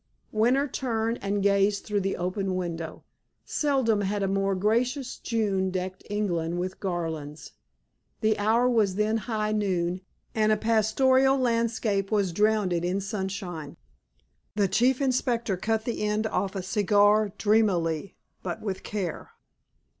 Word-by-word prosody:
Winter 245 +6 +2
turned 230 -3 -2
and 200 0 -1
gazed 200 0 +2
through 210 -1 0
the 195 +1 -1
open 185 +1 -2
window. 165 -3 -4 0.4
Seldom 260 -8 +1
had 200 +1 -1
a - - +1
more 195 0 +1
gracious 240 +7 0
June 200 -5 0
decked 185 0 -4
England 175 -5 -1
with 185 +1 -4
garlands. 160 -5 -4 0.7
The 215 -1 +3
hour 225 +4 +3
was 215 -6 +2
then 215 +2 +1
high 215 -1 -2
noon, 185 -4 0 0.3
and 215 -1 +2
a 215 - +3
pastoral 260 +5 +3
landscape 230 -5 0
was 200 -4 +1
drowned 210 -1 +2
in 175 +3 0
sunshine. 190 -6 -5 0.8
The 205 -2 +2
Chief 245 +8 +2
Inspector 245 -5 0
cut 220 +3 -1
the 235 - -3
end 210 +1 0
off 200 -2 -1
a 190 - -3
cigar 205 +1 +3
dreamily 195 -6 +1 0.3
but 175 -2 -4
with 195 -3 -4
care. 195 -6 -4
205 Hz, 135 wpm, -27 LUFS, 190-225 Hz, 0.8 s, The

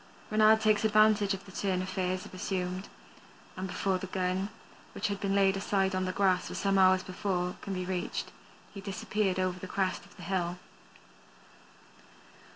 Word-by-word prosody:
Reynard 215 +1 +5
takes 215 -1 +3
advantage 215 -2 +4
of 195 - -11
the 195 - -12
turn 190 -1 -1
affairs 185 -1 -2
have - - -12
assumed, 185 0 -3 0.7
and 185 +1 -4
before 185 +1 0
the 190 - -5
gun, 185 +1 -1 0.4
which - - -1
had 200 -1 -3
been 195 0 0
laid 195 -1 +4
aside 195 -1 +1
on 185 0 0
the 185 - -1
grass 185 -1 +2
some 195 -1 +2
hours 185 0 +5
before, 180 -1 -2
can 195 - -4
be 185 0 -3
reached 180 -1 -3 0.4
he 200 - -7
disappears 195 0 -1
over 185 -1 0
the 185 - -7
crest 185 0 -1
of - - -18
the - - -10
hill. 180 -2 -1
190 Hz, 165 wpm, -30 LUFS, 185-200 Hz, 0.7 s, Reynard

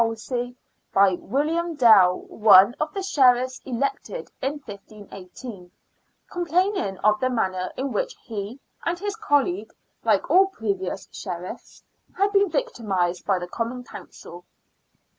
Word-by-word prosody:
Wolsey, 240 +2 -4 0.3
by 195 -1 +5
William 315 - -1
Dale, 210 -9 +6
one 205 0 +6
of 305 0 -1
the 390 +2 -4
Sheriffs 255 -7 +3
elected 280 - -3
in 275 +3 -2
15 205 -2 -12
1 - - -16 0.3
8, 185 -7 -9 0.6
complaining 355 - 0
of 215 0 +4
the 255 - +1
manner 185 -6 -1
in 265 +1 -2
which - - -2
he 220 +1 -6 0.2
and 340 +1 -1
his 410 +3 -4
colleague, 360 -3 0 0.3
like - - +2
all 385 +1 +6
previous 200 - -4
Sheriffs, 180 -2 -8 0.3
had 400 +1 +2
been 400 -1 +3
victimised 195 - -1
by 195 -2 +3
the 175 0 -5
Common 235 +6 -4
Council. 175 -6 -12
245 Hz, 135 wpm, -24 LUFS, -, 0.6 s, Dale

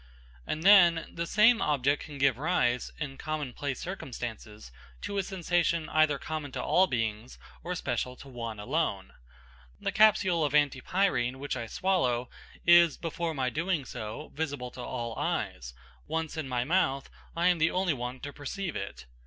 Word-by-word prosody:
And 155 - -3
then, 175 -4 +6
the 170 0 -3
same 225 +5 +5
object 145 -1 +1
can 150 -3 -9
give 135 -3 +2
rise, 130 -7 +1
in 140 -3 -5
common 155 -5 -3
place 140 -1 -4
circumstances, 115 - -7 0.3
to 200 - -2
a - - +3
sensation 175 -3 0
either 155 -2 +3
common 155 -1 -5
to - - -3
all 190 +1 +4
beings 115 -3 -3 0.3
or 180 +1 -3
special 125 -6 -2
to 140 - -13
one 115 -4 -6
alone. 110 -5 -2 0.7
The - - -2
capsule 200 -6 +4
of 145 -1 0
antipyrine 140 -2 +1
which 140 +1 -3
I 120 -2 -4
swallow 125 - 0 0.3
is, 170 -2 +6
before 165 -1 -3
my 130 -2 0
doing 165 -3 -1
so, 115 +5 -7
visible 140 -5 -3
to 125 - -9
all 120 -1 -4
eyes; 60 -1 -3 0.3
once 160 0 -2
in 155 -4 -4
my 125 -1 0
mouth, 140 -3 +1 0.3
I 170 +2 +3
am 175 -2 +2
the 160 +1 +4
only 185 -2 +1
one 125 0 -5
to 145 0 -6
perceive 165 +5 -5
it. 100 -9 -6
145 Hz, 165 wpm, -29 LUFS, 125-170 Hz, 0.7 s, then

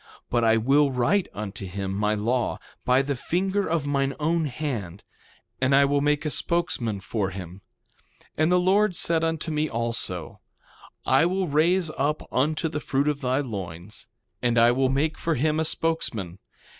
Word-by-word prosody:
But 120 -1 +2
I 115 0 +4
will 140 +5 +3
write 135 +10 +1
unto 100 -1 -6
him 95 +1 -4
my 105 +2 0
law, 120 +4 0 0.3
by 130 +2 +4
the 140 0 -2
finger 190 +9 -1
of 160 -3 0
mine 135 -1 0
own 160 +2 +1
hand; 120 - -4 0.6
and 135 +1 +3
I 140 0 +6
will 140 0 +1
make 150 +1 +1
a 150 - -1
spokesman 130 - 0
for 100 0 -2
him. 95 0 -8 0.6
3:18 - - -25
And 155 +3 +2
the 180 - +4
Lord 190 +1 +3
said 165 0 +2
unto 165 0 -1
me 155 0 0
also: 115 -7 -3 0.7
I 135 +6 +4
will 185 +1 -1
raise 165 +3 +2
up 150 +3 0
unto 155 +5 +1
the 150 -1 -3
fruit 140 0 0
of 150 -1 -1
thy 130 +1 +1
loins; 95 - -7 0.3
and 120 -1 +1
I 115 +1 +6
will 130 +1 +1
make 150 +4 0
for 165 -1 0
him 155 +4 +1
a - - +2
spokesman. 115 - -1
140 Hz, 175 wpm, -25 LUFS, 115-160 Hz, 0.7 s, I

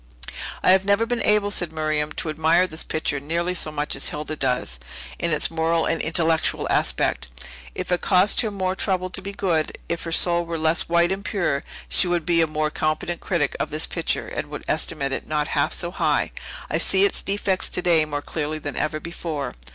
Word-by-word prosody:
"I - - +6
have 190 0 +5
never 200 +3 +3
been 240 0 -1
able," 210 -1 +3
said 175 -5 +2
Miriam, 155 -1 -1
"to 160 - -3
admire 160 +3 +3
this 160 -3 -6
picture 155 -2 -1
nearly 170 +5 -1
so 160 -3 0
much 150 0 -1
as 135 - +1
Hilda 150 +1 -4
does, 125 - -1 0.4
in 170 - +1
its 155 0 +1
moral 165 0 +1
and 165 - 0
intellectual 160 0 +1
aspect. - - +1 0.5
If - - -4
it 180 - +1
cost 190 +1 +4
her 220 - -1
more 190 -2 -1
trouble 185 -2 -1
to 195 - -4
be 195 +1 -5
good, 175 -6 -1
if 170 -1 -2
her 165 - -4
soul 175 +1 +3
were 170 -1 -4
less 160 +2 +1
white 170 +1 +3
and 195 +1 -2
pure, 175 -11 -1 0.2
she 185 - +5
would 175 -2 0
be 170 -1 +3
a 165 - +3
more 155 0 -1
competent 155 +3 -1
critic 160 -6 0
of - - -1
this 155 +2 -1
picture, 165 - -2
and 145 - -4
would 150 - -6
estimate 155 -3 -1
it 135 - -4
not 150 -1 -1
half 145 -2 +1
so 175 -1 -2
high. - - +1 0.4
I - - 0
see 390 - +4
its 400 - 0
defects 195 -1 -1
today 175 -3 +3
more 145 -1 -4
clearly 155 -1 -3
than 145 -2 -5
ever 155 0 -1
before." 155 -4 -4
165 Hz, 205 wpm, -23 LUFS, 155-180 Hz, 0.5 s, I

